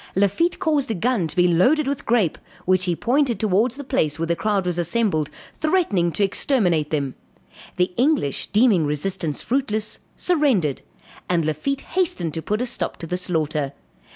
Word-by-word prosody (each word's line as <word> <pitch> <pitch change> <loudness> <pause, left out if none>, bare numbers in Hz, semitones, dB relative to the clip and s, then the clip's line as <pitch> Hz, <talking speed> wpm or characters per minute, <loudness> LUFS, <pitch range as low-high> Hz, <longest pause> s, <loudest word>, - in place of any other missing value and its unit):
Lafitte 200 - +2
caused 295 -5 0
a 220 - -1
gun 215 -2 0
to - - -7
be 180 0 +4
loaded 260 - +3
with 280 0 -3
grape, 225 -9 +2 0.3
which 185 0 +3
he 175 -2 0
pointed 250 - +1
towards 215 +4 +1
the 285 - -7
place 160 - 0
where 165 - -1
the 170 +1 0
crowd 200 0 0
was 175 -1 -1
assembled, 175 -3 0 0.2
threatening 305 - +1
to 205 - +1
exterminate 185 - +1
them. 140 -4 -1 0.6
The 180 0 0
English 250 - +1
deeming 205 -8 +3
resistance 150 +1 -2
fruitless, 220 -5 -1 0.2
surrendered, 265 - +1 0.5
and 170 -3 +1
Lafitte 155 - -2
hastened 320 - -1
to 160 - -3
put 210 +7 -1
a - - -1
stop 245 - -3
to - - -7
the 180 - -3
slaughter. 155 -6 -1
195 Hz, 170 wpm, -22 LUFS, 165-255 Hz, 0.6 s, be